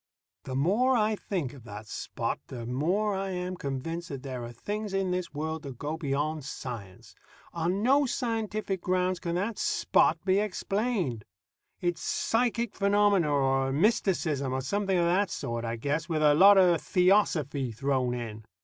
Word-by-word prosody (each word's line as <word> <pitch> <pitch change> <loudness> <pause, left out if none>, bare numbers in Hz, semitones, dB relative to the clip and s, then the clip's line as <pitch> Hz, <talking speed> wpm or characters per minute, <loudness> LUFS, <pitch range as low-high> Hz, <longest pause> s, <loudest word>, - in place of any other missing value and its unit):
The 130 - -4
more 215 - +3
I 215 -1 +2
think 175 -11 -3
of 135 -5 -13
that 105 0 -8
Spot, - - -4
the 120 -3 -7
more 175 - 0
I 195 0 -2
am 180 0 -3
convinced 165 +4 -4
that 140 -2 -6
there 130 -3 -5
are 120 - -6
things 205 - -4
in 190 -1 0
this 180 -1 -2
world 160 +1 -3
that 135 -5 -8
go 150 +4 -3
beyond 150 0 -2
science. 115 -8 -8 0.4
On 175 +4 -1
no 275 +3 +4
scientific 215 -6 -2
grounds 185 0 0
can 170 -1 -3
that 200 +4 -2
Spot 165 - +2
be 190 +1 +3
explained. 200 - -1 0.6
It's 175 -1 -1
psychic 235 -1 0
phenomena, 200 -5 +3
or 135 -1 +2
mysticism, 155 - +1
or 130 - -1
something 195 +7 0
of 170 - +3
that 185 +3 +2
sort, 120 -7 -4
I 115 0 -2
guess, 150 +8 -2
with 155 -2 0
a 150 -1 +6
lot 195 +6 +8
of 175 -3 +5
theosophy 175 - +2
thrown 130 +1 0
in. 110 -3 -6
170 Hz, 165 wpm, -28 LUFS, 135-200 Hz, 0.6 s, lot